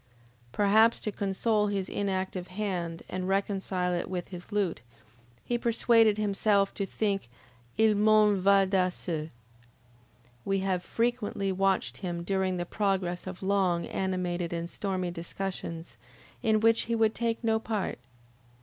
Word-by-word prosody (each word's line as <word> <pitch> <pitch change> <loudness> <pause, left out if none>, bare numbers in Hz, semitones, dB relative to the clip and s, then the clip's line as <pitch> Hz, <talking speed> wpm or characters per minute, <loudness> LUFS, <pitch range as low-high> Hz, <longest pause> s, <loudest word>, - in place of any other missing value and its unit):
Perhaps 215 - +4
to 210 - -2
console 210 +2 0
his 195 -2 -1
inactive 190 -2 -2
hand 180 -4 -3
an 185 0 -4
reconcile 195 -2 0
it 175 - -2
with 180 -2 -4
his 180 +2 -9
lute, 205 -4 0 0.6
he 240 0 -1
persuaded 230 -2 +4
himself 200 -1 +2
to 200 - -3
think: 200 - -1 0.5
Il 220 0 +5
mondo 210 -1 +4
va 195 0 +5
da 185 -1 +2
se. 160 -3 -4 1.1
We 195 0 0
have 185 -2 -1
frequently 230 -4 -1
watched 195 0 0
him 175 -3 -4
during 190 0 0
the 175 - -2
progress 190 -3 -1
of 185 0 -7
long, 190 -3 +1
animated, 180 -2 -2
and 170 0 -3
stormy 185 -1 -3
discussions, 170 -1 -6 0.4
in 220 -2 +2
which 225 0 +4
he 230 - +2
would 220 -1 +3
take 230 0 -2
no 220 -1 +2
part. 215 - -3
195 Hz, 140 wpm, -29 LUFS, 180-210 Hz, 1.1 s, Il